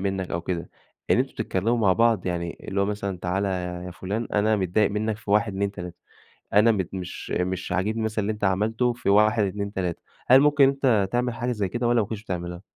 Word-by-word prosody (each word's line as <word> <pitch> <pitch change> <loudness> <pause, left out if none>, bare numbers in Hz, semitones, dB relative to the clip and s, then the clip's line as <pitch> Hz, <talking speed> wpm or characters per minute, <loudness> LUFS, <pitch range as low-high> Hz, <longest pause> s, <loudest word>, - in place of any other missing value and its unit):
منك 95 -1 -2
أو 85 - -1
كده، 85 0 -4 0.4
إن - - +5
أنتم - - 0
بتتكلموا 115 +6 -1
مع 100 -4 +4
بعض؟ 115 -3 +2
يعني 85 -1 -4
اللي 100 0 -1
هو - - +3
مثلًا 100 -2 -3
تعالَ 90 +3 -1
يا 90 -1 -3
فلان 100 +6 -4
أنا 105 +1 +2
متضايق 100 +2 +1
منك 105 +1 -1
في 105 -2 -9
1 105 +1 +3
2 100 +1 -1
3، 90 -3 -8 0.6
أنا 105 +3 +5
متض 95 -5 -1
مش 90 -1 -6
مش 90 0 -2
عاجبني 105 +5 0
مثلًا 110 -1 -1
اللي 105 +2 -1
أنت 105 -1 -5
عملته 110 +6 +1
في 120 - -5
1 105 +1 +4
2 100 +1 -3
3، 90 -4 -3 0.2
هل 130 +2 +7
ممكن 145 0 +5
أنت 140 0 -1
ممكن 100 -2 0
تعمل 120 0 0
حاجة 125 0 -2
زي 105 -4 -1
كده 120 +3 -1
والّا 120 -1 +3
ما 105 - 0
كنتش 110 -2 -6
بتعملها؟ 90 -3 -5
100 Hz, 220 wpm, -25 LUFS, 95-110 Hz, 0.6 s, هل